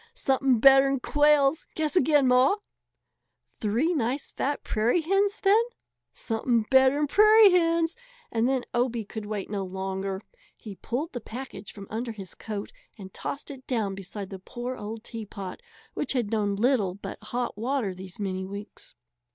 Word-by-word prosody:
"Something 265 Hz, -, +2 dB
better'n 270 Hz, +2 st, +6 dB
quails! 295 Hz, +2 st, +3 dB
Guess 310 Hz, +1 st, -1 dB
again, 295 Hz, -4 st, +4 dB
Ma!" 255 Hz, +8 st, +5 dB, 0.9 s
"Three 235 Hz, +11 st, -1 dB
nice 265 Hz, -1 st, -2 dB
fat 285 Hz, +2 st, -2 dB
prairie 235 Hz, +10 st, +1 dB
hens 390 Hz, +5 st, +1 dB
then." 410 Hz, +3 st, +5 dB, 0.5 s
"Something 225 Hz, 0 st, -1 dB
better'n 265 Hz, +3 st, +5 dB
prairie 425 Hz, +5 st, +7 dB
hens." 335 Hz, -1 st, +2 dB, 0.4 s
And 230 Hz, +2 st, +1 dB
then 265 Hz, -2 st, 0 dB
Obie 240 Hz, -1 st, 0 dB
could 215 Hz, 0 st, -7 dB
wait 205 Hz, -2 st, -4 dB
no 200 Hz, -2 st, -2 dB
longer. 190 Hz, +1 st, -4 dB, 0.3 s
He 215 Hz, -4 st, -9 dB
pulled 245 Hz, -, -4 dB
the 245 Hz, -, -5 dB
package 220 Hz, -4 st, -8 dB
from 200 Hz, -1 st, -10 dB
under 230 Hz, +1 st, -3 dB
his 195 Hz, -4 st, -8 dB
coat 210 Hz, -2 st, -6 dB, 0.3 s
and 190 Hz, -3 st, -10 dB
tossed 285 Hz, -, -5 dB
it 265 Hz, -2 st, -11 dB
down 220 Hz, -6 st, -1 dB
beside 195 Hz, +1 st, -7 dB
the 190 Hz, -, -7 dB
poor 240 Hz, +6 st, -6 dB
old 220 Hz, 0 st, -7 dB
teapot, 205 Hz, -, -7 dB, 0.3 s
which -, -, -1 dB
had 240 Hz, -5 st, -1 dB
known 205 Hz, -2 st, 0 dB
little 210 Hz, -4 st, +1 dB
but 200 Hz, -, -8 dB
hot 245 Hz, +2 st, -3 dB
water 230 Hz, -2 st, -1 dB
these 185 Hz, 0 st, -10 dB
many 190 Hz, -2 st, -2 dB
weeks. 200 Hz, -4 st, -9 dB
240 Hz, 155 wpm, -27 LUFS, 205-275 Hz, 0.9 s, prairie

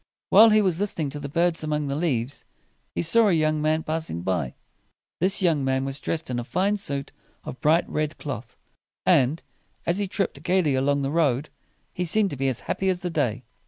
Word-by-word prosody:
While 225 Hz, +1 st, +9 dB
he 215 Hz, 0 st, +4 dB
was 180 Hz, -3 st, +1 dB
lis 205 Hz, 0 st, -1 dB
ten 160 Hz, -, -1 dB
ing -, -, -3 dB
to 145 Hz, -, -5 dB
the 145 Hz, -1 st, -6 dB
birds 170 Hz, +2 st, +1 dB
among 150 Hz, -1 st, -1 dB
the 140 Hz, -, -2 dB
leaves, 140 Hz, -5 st, -1 dB, 0.5 s
he -, -, 0 dB
saw 225 Hz, +7 st, +4 dB
a -, -, +3 dB
young 155 Hz, -1 st, +1 dB
man 155 Hz, +1 st, +1 dB
passing 155 Hz, -, -3 dB
by. 90 Hz, -9 st, -1 dB, 0.6 s
This 190 Hz, +2 st, +2 dB
young 160 Hz, -6 st, +2 dB
man 130 Hz, 0 st, 0 dB
was 135 Hz, +1 st, -3 dB
dressed 160 Hz, -5 st, -3 dB
in 120 Hz, -, -1 dB
a -, -, -3 dB
fine 195 Hz, -, 0 dB
suit 140 Hz, -8 st, -3 dB, 0.3 s
of 125 Hz, -, -8 dB
bright 160 Hz, +3 st, +3 dB
red 155 Hz, 0 st, -2 dB
cloth; 130 Hz, -5 st, -7 dB, 0.5 s
and, 135 Hz, +6 st, +3 dB, 0.4 s
as 170 Hz, +4 st, +1 dB
he 200 Hz, -, -1 dB
tripped 195 Hz, +1 st, -2 dB
gayly 180 Hz, -5 st, +2 dB
along 140 Hz, +2 st, +1 dB
the 135 Hz, -, -1 dB
road, 150 Hz, -3 st, +1 dB, 0.4 s
he 180 Hz, -, -2 dB
seemed 200 Hz, +4 st, +1 dB
to -, -, -4 dB
be 135 Hz, 0 st, -1 dB
as 130 Hz, -3 st, -2 dB
happy 190 Hz, -, -1 dB
as 180 Hz, -1 st, -1 dB
the 180 Hz, -, -2 dB
day. 125 Hz, -6 st, -1 dB
155 Hz, 215 wpm, -25 LUFS, 135-175 Hz, 0.6 s, While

